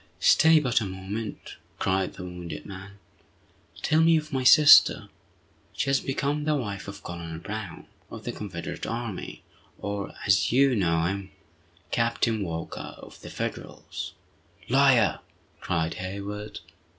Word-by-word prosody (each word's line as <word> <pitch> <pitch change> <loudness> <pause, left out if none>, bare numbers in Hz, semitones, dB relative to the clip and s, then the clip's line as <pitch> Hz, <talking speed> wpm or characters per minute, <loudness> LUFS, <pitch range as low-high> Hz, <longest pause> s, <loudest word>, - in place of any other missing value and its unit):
"Stay 160 0 +6
but 125 -6 +1
a - - -2
moment!" 95 +4 -6 0.2
cried 95 0 0
the - - -9
wounded 85 -4 -7
man. 95 +1 -10 0.9
"Tell 155 +1 +3
me 165 0 +5
of 155 -1 -5
my 130 -1 0
sister!" 145 +3 +7 0.6
"She 135 - -1
has 135 - +3
become 145 +2 -2
the 155 -1 +2
wife 100 -8 -4
of 100 0 -9
Colonel 85 -2 -6
Brown, 100 0 -7 0.2
of - - -9
the - - -3
Confederate 90 -5 -6
army, 115 -4 -5 0.3
or, 100 -1 -5
as 95 -1 +3
you 135 +1 +4
know 85 -5 +1
him, 95 +2 -2 0.6
Captain 115 -1 +1
Walker, 80 -2 -6
of - - -14
the - - -9
Federals!" - - -6 0.6
"Liar!" 130 -3 +4 0.4
cried 80 -1 -1
Hayward. 100 +3 -6
100 Hz, 135 wpm, -26 LUFS, 95-130 Hz, 0.9 s, sister